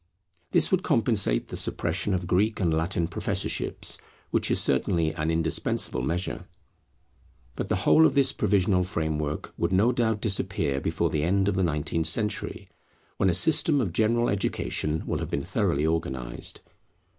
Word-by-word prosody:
This - - +3
would 190 -1 +2
compensate 110 - +1
the - - -6
suppression 90 +4 -1
of 90 -1 -3
Greek 105 +5 +1
and 85 -5 +1
Latin 85 +1 0
professorships, - - -2 0.3
which - - 0
is - - +3
certainly 80 -2 +1
an 75 +1 -2
indispensable 80 -5 0
measure. 85 +8 -3 1.1
But - - -4
the - - +2
whole 160 0 +6
of 135 - -3
this 140 -1 +3
provisional 95 -2 +2
framework 80 -4 -3
would 85 - 0
no 100 +6 +3
doubt 115 -3 0
disappear 85 -9 -1
before - - -1
the 75 - 0
end 95 +5 +1
of 100 - +1
the 95 - 0
nineteenth 80 0 -1
century, 105 +5 -2 0.5
when 95 - +2
a 85 - +2
system 150 - +4
of 100 -10 -2
general 115 +3 +2
education 80 -5 -2
will - - -2
have - - -4
been - - -2
thoroughly 70 +2 0
organized. 65 -7 -2
90 Hz, 155 wpm, -26 LUFS, 80-105 Hz, 1.1 s, whole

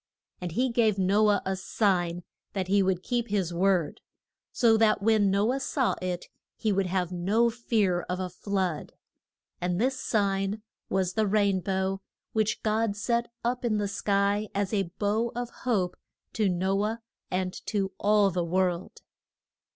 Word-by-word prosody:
And 175 -2 -4
he 255 +5 +1
gave 220 -4 +2
No 200 +3 +3
ah 205 -2 +3
a 190 0 0
sign 180 -3 0 0.3
that 185 -2 -2
he 200 +1 +4
would 185 -1 0
keep 240 -2 -1
his 195 -5 -1
word, 180 -2 +1 0.5
so 230 -2 +4
that 220 -2 +3
when 215 -2 +4
No 200 +5 +2
ah 270 - -1
saw 265 -1 0
it 180 -1 -3 0.3
he 215 - 0
would 195 -1 +1
have 180 -1 -1
no 205 +7 +2
fear 215 -6 +1
of 180 +1 -2
a 185 - -2
flood. 185 -3 -2 0.7
And 180 0 0
this 260 +3 +1
sign 200 0 0 0.3
was 185 -1 0
the 220 -1 +1
rain 200 -2 +2
bow, 190 +1 -1 0.3
which 215 -1 0
God 215 -1 +1
set 235 +3 0
up 245 +1 -1
in 225 -3 +1
the 205 -1 0
sky 200 +1 0
as 200 +1 -1
a 195 -4 0
bow 220 +3 0
of 240 0 -4 0.2
hope 185 -6 +1 0.4
to 210 -3 +1
No 190 +3 +1
ah 220 +2 -1 0.3
and 185 0 -1
to 195 -3 -1
all 205 -1 +4
the 175 0 -1
world. 180 0 -1
200 Hz, 165 wpm, -28 LUFS, 185-220 Hz, 0.7 s, he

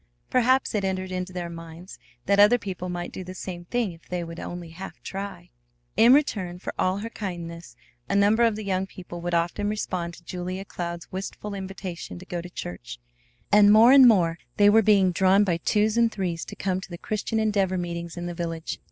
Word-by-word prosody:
Perhaps 255 +1 +3
it 210 -2 0
entered 185 -1 -2
into 185 0 -3
their 180 -1 -4
minds 165 +2 -10 0.3
that 200 +1 +3
other 210 +4 +7
people 185 -4 -5
might 175 0 -4
do 185 - -6
the 185 +1 -9
same 175 -1 -7
thing 235 0 -1
if 165 -1 -17
they 180 -1 -2
would 165 0 -8
only 175 -1 -6
half 185 +4 -9
try. 195 -3 -6 0.4
In 230 +3 +6
return 210 -11 +2
for 180 - -6
all 185 +1 +1
her 220 +3 -5
kindness 170 - -6 0.3
a - - +1
number 205 +3 +4
of 230 -2 +4
the 215 - -5
young 190 -1 -1
people 175 -3 -9
would 175 0 -1
often 175 +5 0
respond 180 -5 -3
to - - -17
Julia 185 +2 -5
Cloud's 170 -2 -6
wistful 195 +2 -5
invitation 190 -3 -6
to 180 - -11
go 175 -2 -4
to 175 - -9
church, - - -7 0.5
and 205 0 +7
more 225 +4 +8
and 270 -2 +9
more 170 -7 +3 0.2
they 205 0 +6
were 225 +1 +6
being 200 -3 +4
drawn 190 +3 +4
by 175 -4 +1
twos 210 +5 +1
and 230 -1 +4
threes 180 -6 -3
to - - -9
come 190 -1 -1
to - - -10
the 175 - -7
Christian 215 +4 -3
Endeavor 200 -4 +1
meetings 170 -1 -5
in 175 - -4
the 175 - -4
village. 165 -1 -4
185 Hz, 210 wpm, -25 LUFS, 175-205 Hz, 0.5 s, and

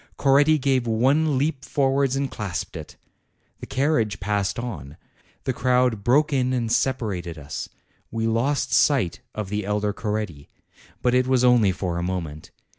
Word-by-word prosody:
Coretti 145 +3 +4
gave 130 -3 +1
one 135 +6 +2
leap 140 -1 -1
forwards 135 0 +1
and 135 0 -2
clasped 100 -4 -5
it. - - -8 0.6
The - - -8
carriage 125 - 0
passed 100 0 -1
on; 80 - -6 0.5
the 130 - -1
crowd 125 -3 +1
broke 145 +6 +3
in 130 -1 +1
and 120 -3 -1
separated 100 -12 -1
us; 75 -1 -6 0.4
we 115 0 -2
lost 115 +6 0
sight 130 - +3 0.2
of 105 -3 -4
the 105 +1 -2
elder 105 +1 -1
Coretti. 105 -10 -4 0.5
But 125 - +2
it 125 0 +3
was 130 -1 +2
only 120 -5 +5
for 90 -2 -3
a - - -3
moment. 85 -4 -4
120 Hz, 155 wpm, -24 LUFS, 100-135 Hz, 0.6 s, only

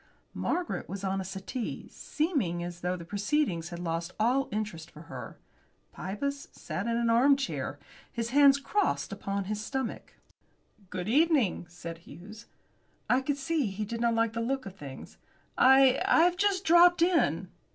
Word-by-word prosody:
Margaret 345 - -2
was 195 +1 -6
on 195 0 -1
a - - -4
settee, 195 +6 -5
seeming 260 - -1
as 175 0 -7
though 180 +1 -1
the 170 - -9
proceedings 200 - -1
had 175 - -7
lost 170 0 -3
all 255 +5 +2
interest 205 -6 -4
for 155 - -13
her. 125 -6 -9 0.6
Pybus 280 +10 -4
sat - - -5
in 230 0 0
an 235 -1 +2
arm 265 +5 +5
chair, 270 - -3 0.3
his 235 0 -3
hands 280 0 +6
crossed 380 - -1
upon 200 0 -3
his 210 +2 -4
stomach. 265 0 -4 0.7
"Good 185 0 -4
evening," 270 - +2
said 170 -1 -8
Hughes. 210 +6 -12 0.6
I 255 - +4
could 280 +1 -1
see 295 -2 0
he 200 +2 -4
did 230 +2 -5
not 235 -1 +2
like 230 -1 +1
the 230 - -2
look 265 +2 -2
of 195 -1 -8
things. 140 -7 -10 0.4
"I 265 0 +6
I've 350 +2 +4
just 390 0 +1
dropped 345 +1 +6
in." 195 - +2
230 Hz, 160 wpm, -29 LUFS, 185-280 Hz, 0.7 s, hands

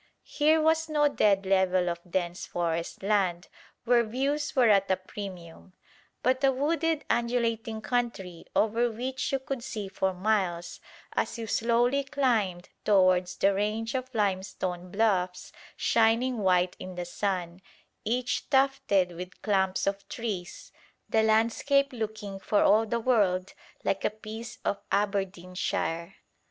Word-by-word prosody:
Here 310 +1 +3
was 320 +1 +2
no 295 -1 +3
dead 200 -8 +2
level 190 -1 +2
of 170 -1 -2
dense 175 -1 -2
forest 170 +1 -3
land 195 -3 +1 0.4
where 240 0 +4
views 275 +7 -2
were 250 -3 +5
at 195 -2 +4
a 190 - +4
premium, 185 -2 -9 0.5
but 260 +2 +1
a 270 - +5
wooded 315 +3 0
undulating 230 -2 0
country 215 -9 -2
over 230 +3 +2
which 250 +3 -3
you 270 - +2
could 265 -1 -5
see 220 -6 -5
for 190 0 -1
miles 185 -3 -1 0.3
as - - -1
you 230 - -4
slowly 240 +5 +2
climbed 235 -11 0
towards 185 -3 +3
the 195 +2 +3
range 215 +3 -1
of 255 -1 -3
limestone 185 -3 -2
bluffs 185 -3 0 0.3
shining 230 +2 +2
white 180 -2 +2
in 185 0 -7
the 175 0 -4
sun, 180 -1 -3 0.4
each 250 +2 -1
tufted 270 -9 +2
with 180 +2 -9
clumps 190 -3 +1
of 195 0 -3
trees, 205 -7 -5 0.4
the 220 - +3
landscape 230 +6 +2
looking 215 -4 -5
for 205 +1 +2
all 220 +2 +4
the 235 +2 -1
world 200 -6 +1 0.3
like 195 - -1
a - - +3
piece 220 +1 -8
of 200 - -1
Aberdeenshire. 185 -3 -2
210 Hz, 135 wpm, -28 LUFS, 185-245 Hz, 0.5 s, were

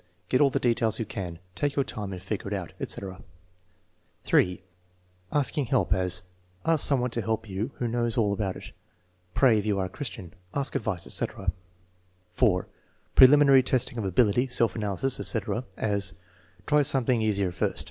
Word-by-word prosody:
"Get 130 - +3
all 140 - +6
the - - -1
details 115 -2 +1
you 115 - -2
can." 90 -5 -6 0.2
"Take 145 +10 -1
your 140 - +1
time 105 -2 -6
and 95 - -6
figure 95 +2 -5
it 100 - -2
out," 90 -4 -6
etc. 95 -2 -5 1.0
(3) 90 0 +2 0.7
Asking 145 -1 +1
help; 95 -4 +2
as: 90 -1 0 0.4
"Ask 165 -3 +5
some 135 -3 +3
one 125 0 -1
to 115 - -2
help 110 +1 -2
you 100 +5 -3
who 120 - -2
knows 120 +1 -1
all 105 -3 +2
about 100 -2 -2
it." - - -10 0.6
"Pray, 120 -5 +5
if 105 - -4
you 105 -2 +1
are 95 - 0
a - - -6
Christian." 100 - -7 0.2
"Ask 140 0 -2
advice," 105 -6 -2
etc. 95 -2 -1 0.8
(4) 90 -3 +2 0.5
Preliminary 140 0 +8
testing 130 -1 -1
of 105 - -3
ability, 110 +6 +2
self 120 -3 +1
analysis, 105 +4 -1
etc.; 115 +2 0
as: 100 -2 0 0.5
"Try 150 0 +3
something 130 -4 +1
easier 100 -4 +1
first." 90 - -2
110 Hz, 170 wpm, -27 LUFS, 95-130 Hz, 1.0 s, Preliminary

